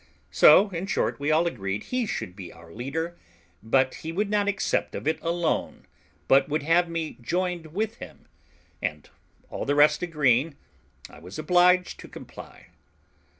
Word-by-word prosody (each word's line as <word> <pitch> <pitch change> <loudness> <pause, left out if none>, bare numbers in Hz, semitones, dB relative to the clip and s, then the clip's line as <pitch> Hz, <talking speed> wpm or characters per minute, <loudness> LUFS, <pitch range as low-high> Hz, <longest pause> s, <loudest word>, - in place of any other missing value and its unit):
So, 195 +7 +6
in 180 +2 -4
short, - - -1
we 145 +1 -1
all 160 +2 +3
agreed 100 - -3
he 250 -3 -2
should 90 - -5
be 90 -4 -9
our 85 0 -15
leader; 160 +9 -4 0.4
but 130 +4 +2
he 160 - -5
would 200 +4 -2
not 205 -1 +1
accept 200 -1 -1
of - - -5
it 160 - 0
alone, 170 0 -2 0.4
but 135 +2 +4
would 150 0 -1
have 170 +3 +3
me 165 -4 -4
joined 175 +4 -2
with 215 +8 -3
him; - - -12 0.6
and - - -4 0.4
all - - -4
the 145 - 0
rest 150 +1 +4
agreeing, 150 -4 +1 0.5
I - - -15
was 90 +4 -10
obliged 180 +3 +3
to - - -10
comply. - - -12
160 Hz, 160 wpm, -26 LUFS, 135-180 Hz, 0.6 s, So